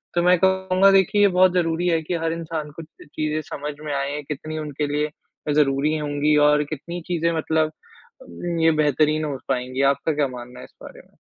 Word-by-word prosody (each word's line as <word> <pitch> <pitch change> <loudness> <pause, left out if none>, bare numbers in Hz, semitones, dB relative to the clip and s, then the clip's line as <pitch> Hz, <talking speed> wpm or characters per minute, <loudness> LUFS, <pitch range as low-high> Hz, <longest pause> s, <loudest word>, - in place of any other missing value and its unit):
तो 175 - +2
मैं 180 0 +5
कहूँगा 190 +1 +3
देखिए 195 +1 +3
ये 205 - +7
बहुत 185 -1 +6
ज़रूरी 175 0 0
है 165 -1 +1
कि 175 +3 -3
हर 165 - 0
इंसान 160 -2 -5
को - - -6 0.2
चीज़ें 155 +1 -3
समझ 150 +1 -5
में 145 - -3
आएँ 140 +2 -2
कितनी 155 +1 -5
उनके 150 -1 -3
लिए 150 +1 0 0.4
ज़रूरी 145 +1 +2
होंगी 150 0 0
और 150 0 +3
कितनी 170 +4 -6
चीज़ें 170 -2 0
मतलब 155 0 0 0.5
अम, 175 - -5
ये 165 - +5
बेहतरीन 155 0 +2
हो 140 -3 -3
पाएँगी। 130 0 -1
आपका 140 +3 -2
क्या 145 -1 +1
मानना 125 0 -10
है - - -9
इस - - -22
बारे - - -11
में? - - -29
155 Hz, 195 wpm, -22 LUFS, 145-170 Hz, 0.5 s, ये